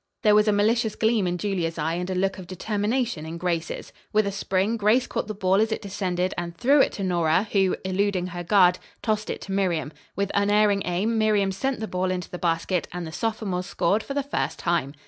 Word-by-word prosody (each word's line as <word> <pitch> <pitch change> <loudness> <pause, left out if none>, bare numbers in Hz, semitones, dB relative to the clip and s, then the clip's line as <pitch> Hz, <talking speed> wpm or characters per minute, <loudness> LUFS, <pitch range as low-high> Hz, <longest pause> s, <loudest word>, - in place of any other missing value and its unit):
There 210 -2 +5
was 210 +1 +5
a - - +5
malicious 220 +2 +2
gleam 220 -4 +2
in 175 0 -1
Julia's 175 -4 -2
eye 160 +1 -1
and 180 +2 -3
a 185 - -1
look 195 +1 0
of 180 - -9
determination 210 +1 -1
in 160 +1 -6
Grace's. 170 -1 -3 0.2
With 215 0 +3
a 200 - -1
spring, 195 +2 0
Grace 225 +3 +3
caught - - -3
the 215 - -5
ball 195 0 +2
as 220 0 +1
it - - -1
descended 185 -2 -2
and 170 -1 -6
threw 275 +6 +5
it - - +3
to 200 - -4
Nora, 175 +1 +2
who, 190 -2 +3
eluding 190 -1 0
her 175 -1 -5
guard, 180 -1 +4 0.2
tossed 215 -1 -1
it - - -4
to 195 - -7
Miriam. 170 -7 0 0.2
With 200 0 -1
unerring 205 0 +3
aim 205 +6 0
Miriam 210 -3 +2
sent 260 +6 -2
the 220 - -2
ball 185 -1 -1
into 180 -1 -3
the 180 - -6
basket 170 +1 0
and 180 -1 -5
the 160 - -7
sophomores 200 -3 -2
scored 200 +1 +1
for 275 - -6
the 285 - 0
first 285 - -2
time. 170 -5 -1
195 Hz, 225 wpm, -25 LUFS, 180-215 Hz, 0.2 s, There